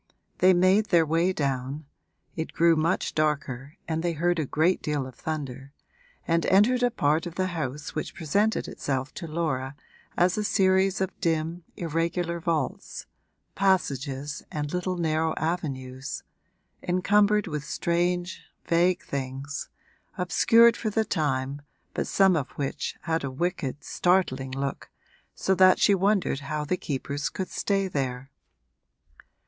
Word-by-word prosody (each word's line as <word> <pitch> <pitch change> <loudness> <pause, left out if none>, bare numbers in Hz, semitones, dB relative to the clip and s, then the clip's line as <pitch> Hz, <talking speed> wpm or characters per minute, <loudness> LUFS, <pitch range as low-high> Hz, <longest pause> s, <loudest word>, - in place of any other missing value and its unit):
They 185 - +6
made 190 +4 +4
their 170 -3 +4
way 165 +4 +2
down 140 -2 -2 0.5
it 160 -1 -4
grew 170 0 +4
much 160 +3 0
darker 145 -3 -1
and 160 -1 -1
they 170 0 0
heard 170 +2 +1
a 150 - -1
great 170 +7 +2
deal 150 -3 -1
of 130 - -9
thunder 140 -2 -5 0.5
and 165 0 +2
entered 225 +6 +4
a 245 - +4
part 155 -5 +1
of 170 - -8
the 185 - 0
house 150 -2 -4
which 155 - -4
presented 205 +7 +1
itself 135 -1 -3
to 170 - -6
Laura 145 -4 -2 0.4
as 180 +3 +3
a - - 0
series 190 -2 +2
of 190 0 0
dim, 165 +1 -1
irregular 170 +1 -1
vaults 160 -5 -2 0.5
passages 145 -7 0
and 150 0 -3
little 180 0 -1
narrow 160 -1 0
avenues 135 -6 -3 0.6
encumbered 205 +3 +3
with 150 -4 -4
strange 175 +3 -1 0.2
vague 175 +2 +2
things, 135 +1 -5 0.5
obscured 230 +6 +5
for 220 - -2
the 220 +1 +1
time 140 -5 -1 0.3
but - - -2
some 190 -2 +4
of 140 -5 -1
which 140 -2 -3
had 165 -2 -1
a 140 - -2
wicked, 150 -1 -3
startling 175 -8 +1
look, 135 +1 -4 0.5
so 190 - +1
that 185 0 +6
she 205 - +4
wondered 195 -6 +1
how 150 +1 -3
the 165 - 0
keepers 145 -2 -3
could 190 - -5
stay 195 -1 0
there. 135 -4 -3
165 Hz, 140 wpm, -26 LUFS, 140-185 Hz, 0.6 s, They